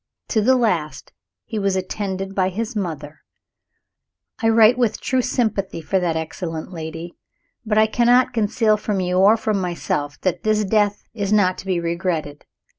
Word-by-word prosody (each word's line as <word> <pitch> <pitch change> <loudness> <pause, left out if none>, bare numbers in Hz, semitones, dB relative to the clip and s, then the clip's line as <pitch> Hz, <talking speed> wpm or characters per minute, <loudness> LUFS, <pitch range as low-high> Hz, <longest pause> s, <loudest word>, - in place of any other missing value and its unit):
To 220 - +2
the 260 +5 +4
last 180 -11 -1 0.3
he 220 - -4
was 195 -1 0
attended 190 0 -3
by 185 -1 +1
his 225 +5 -4
mother. 155 -6 -5 1.2
I 225 - +3
write 225 +1 +6
with 240 -3 0
true 260 -1 0
sympathy 215 -7 -1
for 190 +4 0
that 175 -3 -1
excellent 160 +1 -5
lady 165 +1 -7 0.5
but 210 0 +1
I 215 - +6
cannot 245 +3 +3
conceal 215 -1 +2
from 210 -2 -2
you 180 0 0
or 205 +4 +6
from 215 -3 -1
myself 150 -5 -3
that 185 - -1
this 215 -1 +1
death 205 0 +1
is 205 -3 -3
not 195 -4 +3
to 195 - -10
be 185 -2 0
regretted. 170 -3 -3
195 Hz, 165 wpm, -21 LUFS, 175-220 Hz, 1.2 s, write